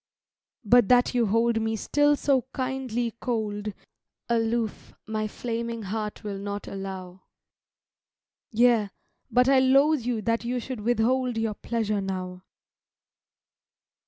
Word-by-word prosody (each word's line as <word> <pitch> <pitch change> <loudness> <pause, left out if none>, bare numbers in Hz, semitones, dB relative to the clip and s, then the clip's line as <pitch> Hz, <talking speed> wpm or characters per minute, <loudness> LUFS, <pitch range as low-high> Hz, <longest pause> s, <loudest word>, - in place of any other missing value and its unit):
But 240 0 +5
that 245 0 +4
you 240 -3 +2
hold 230 +2 +2
me 220 0 -1
still 290 +6 +2
so 275 -3 +1
kindly 255 -3 -2
cold 215 -3 -2 0.6
Aloof 230 -1 -1
my 215 0 -2
flaming 230 0 -4
heart 210 +2 -4
will 200 -2 -4
not 200 +1 -5
allow; 190 -2 -7 1.3
Yea, 230 -2 +3 0.4
but 250 +1 +3
I 270 -1 +6
loathe 275 +3 +4
you 235 -2 -2
that 230 +2 0
you 245 +1 -1
should 250 0 -6
withhold 240 +2 +1
Your 225 -1 0
pleasure 215 -2 -2
now. 185 -1 -4
230 Hz, 120 wpm, -26 LUFS, 210-245 Hz, 1.3 s, I